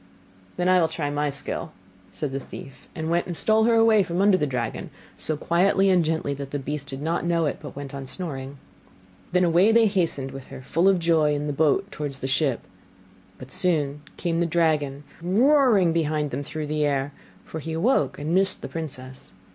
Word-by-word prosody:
'Then 180 - 0
I 185 -1 +5
will 165 - +3
try 145 -3 -3
my 145 0 0
skill,' 140 0 -4 0.4
said 150 -3 -4
the 135 - -3
thief, 135 0 -11
and 160 +1 -3
went 170 +1 +1
and 175 - -3
stole 220 +6 +3
her 235 0 +4
away 225 -2 +5
from 175 -1 -2
under 200 0 +5
the 150 -5 0
dragon, 125 -4 -3 0.3
so 155 - -1
quietly 190 +4 +3
and 180 -2 +4
gently 160 -2 -1
that 140 -1 -6
the 145 - -3
beast 140 +1 -5
did 135 +1 -6
not 165 +2 -1
know 170 -1 +1
it, 145 - -2
but 145 -3 -9
went 140 -1 -7
on 135 -1 -6
snoring. 140 -4 -6 0.7
Then 180 0 +3
away 175 +5 +4
they 230 0 +5
hastened 170 -10 0
with 135 0 -9
her 130 - -10
full 170 +8 +2
of 195 - +4
joy 160 -3 +2
in 145 - -2
their 145 - -2
boat 160 +7 +2
towards 145 -2 -5
the 130 - -3
ship; 135 -2 +1 0.8
but - - -11
soon 150 -5 0 0.2
came 170 -2 -1
the 170 - +1
dragon 150 -4 0 0.2
roaring 215 - +4
behind 155 -3 0
them - - -3
through 155 +2 -5
the 150 0 -1
air; 140 -1 0 0.3
for 160 - -6
he 160 +1 -5
awoke 210 +12 +1
and 150 +3 -3
missed 190 +1 +1
the - - -3
princess. 130 -5 -8
160 Hz, 205 wpm, -24 LUFS, 140-180 Hz, 0.8 s, I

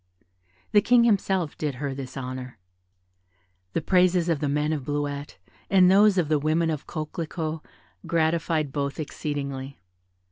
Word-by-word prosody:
The 205 - +6
King 240 +3 +5
himself 190 -7 +1
did 150 -3 -3
her 140 +1 -3
this 135 -1 -7
honour. 130 -2 -6 1.2
The 165 - -1
praises 180 -1 +3
of 165 -4 +1
the 145 - -1
men 150 +2 0
of 145 -4 -3
Bleuette, 145 0 -3 0.3
and 185 -2 +6
those 205 0 +5
of 175 -4 +2
the 155 -1 +2
women 160 +2 +1
of 150 -2 -5
Coquelicot, 160 0 -4 0.5
gratified 160 -2 +1
both 140 0 -3
exceedingly. 140 -3 -4
155 Hz, 140 wpm, -25 LUFS, 140-170 Hz, 1.2 s, The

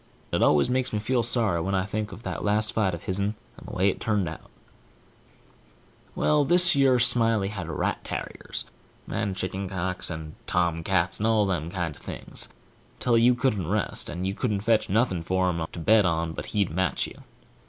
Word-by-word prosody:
It - - +1
always 75 -1 +4
makes 125 0 0
me 105 - -1
feel 120 +4 +1
sorry 110 -7 +1
when 95 +3 -1
I 95 0 +1
think 105 +1 -3
of - - -10
that - - -4
last 105 +1 +1
fight 95 -5 +1
of 85 - -11
his'n, 100 +3 -1 0.2
and - - -13
the - - -7
way 95 +2 +3
it 100 - 0
turned 105 -5 +1
out. 80 - -8 1.7
Well, 150 -1 +3
thish 175 +3 +4
yer 135 -2 +4
Smiley 115 -4 +3
had 90 -6 -6
rat 75 - -2
tarriers, - - -5 0.4
and 100 -2 -2
chicken 95 +1 -3
cocks, 90 0 -2
and 80 -2 -6
tomcats, 85 +1 +1
and 110 - +1
all 110 -2 +3
them 85 -4 -1
kind 85 -4 -3
of - - -18
things, - - -4 0.5
till 120 -2 +2
you 120 +2 +5
couldn't 115 - 0
rest, - - -1
and 90 +2 -4
you 95 - -1
couldn't 105 -2 -1
fetch 110 0 +2
nothing 100 -4 +1
for 95 +2 +1
him 85 -1 -2
to - - -10
bet 105 +6 +4
on 85 -2 0
but - - -6
he'd 100 -5 0
match 95 +2 0
you. - - -11
100 Hz, 195 wpm, -26 LUFS, 90-115 Hz, 1.7 s, you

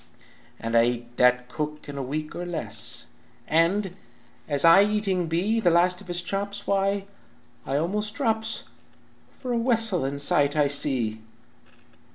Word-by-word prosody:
"And 115 0 -3
I 115 0 +6
eat 120 0 -4
that 125 0 +3
cook 150 +3 -5
in 145 - -7
a 140 - -3
week 150 +4 -4
or 175 - -4
less, 115 -11 -2 0.4
And 180 +4 +2 0.5
as 145 +1 +3
I 165 +4 +8
eating 205 -4 0
be 190 +8 +1
The 190 -6 +3
last 180 +2 +3
of 200 - -14
his 175 0 -2
chops, 200 +2 -3
why, 195 0 0 0.6
I 135 - 0
almost 210 +7 -2
drops, 225 -4 -1 0.7
For 250 -2 -4
a 235 - +1
wessel 225 - +2
in 140 +1 -2
sight 140 0 +1
I 150 -1 +3
see! 130 -7 0
170 Hz, 155 wpm, -25 LUFS, 140-200 Hz, 0.7 s, I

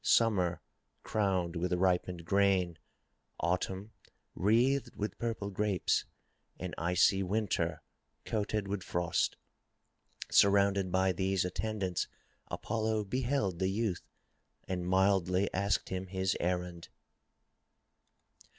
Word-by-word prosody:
Summer 95 -7 +3 0.4
crowned 95 -5 0
with 90 +2 -1
ripened 90 -1 +1
grain. 95 -3 +2 0.6
Autumn 95 +4 -1 0.4
wreathed 120 +7 +2
with 105 -1 -4
purple 110 -4 -2
grapes, 100 -2 +1 0.5
and - - -5
icy 90 +4 +3
Winter 90 -5 -1 0.4
coated 105 -1 -1
with 100 -1 -2
frost. 85 +1 0 0.9
Surrounded 100 -1 +4
by 95 +1 +3
these 95 0 0
attendants, 95 -1 -2 0.4
Apollo 110 -1 -1
beheld 120 -4 -1
the 95 - +1
youth 100 -3 -1 0.7
and 90 -1 -2
mildly 95 0 +2
asked 100 0 0
him 95 0 -3
his 95 0 0
errand. 90 -1 -2
95 Hz, 95 wpm, -32 LUFS, 90-105 Hz, 0.9 s, Surrounded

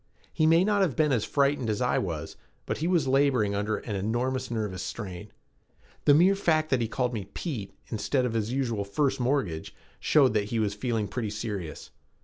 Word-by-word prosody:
He 155 - +3
may 165 +2 +5
not 205 0 +2
have 175 -9 +1
been 150 -2 +2
as 120 -5 +1
frightened 140 -4 +1
as 105 - 0
I - - +2
was - - -4 0.3
but - - -3
he 160 - 0
was 170 -6 +2
laboring 130 -6 +3
under 105 +1 -1
an 105 - -5
enormous 120 +6 -1
nervous 105 -6 -3
strain. 100 -1 -6 0.7
The 145 - +7
mere 180 +5 +6
fact 155 -5 +1
that 130 -2 +3
he 115 - 0
called 125 +2 -1
me 105 -4 -5
"Pete" 120 - -4 0.2
instead 125 +4 0
of 120 - -2
his 110 0 -1
usual 120 -6 -1
"First 130 +9 0
Mortgage" 120 - -1 0.2
showed 135 -6 +4
that 105 -2 +1
he 115 +2 -3
was 105 -2 +1
feeling 110 -1 -1
pretty 115 -2 -3
serious. 100 -7 -5
120 Hz, 195 wpm, -27 LUFS, 105-140 Hz, 0.7 s, The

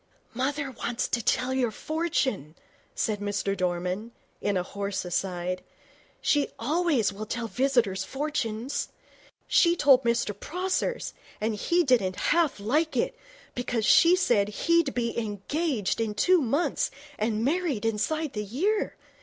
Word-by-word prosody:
'Mother 275 +3 -1
wants 240 -1 -2
to 235 - 0
tell 250 +4 +1
your 255 -3 +1
fortune,' 260 - -2 0.4
said 215 -2 0
Mr 205 -1 -1
Dorman, 180 +4 -2 0.3
in 200 -2 +1
a 180 - 0
hoarse 200 0 -4
aside. 180 0 -2 0.6
'She 290 -1 +2
always 280 - +1
will 215 +2 -6
tell 235 +1 -3
visitors' 230 -4 +1
fortunes. 260 -1 -2 0.6
She 340 -1 +4
told 275 -5 +5
Mr 235 -3 +1
Prosser's, 370 - -2 0.3
and 220 +1 0
he 340 - +2
didn't 225 - +2
half 325 - +1
like 300 +10 0
it, - - 0 0.4
because 245 -3 -1
she 340 +9 +7
said 235 - +2 0.2
he'd 335 -4 +3
be 235 -1 -1
engaged 225 - -1
in 215 -2 -2
two 360 - +4
months 285 +4 0 0.3
and 215 +1 0
married 295 - 0
inside 270 +8 -1
the 210 - -2
year. 370 - 0
235 Hz, 135 wpm, -27 LUFS, 205-300 Hz, 0.6 s, she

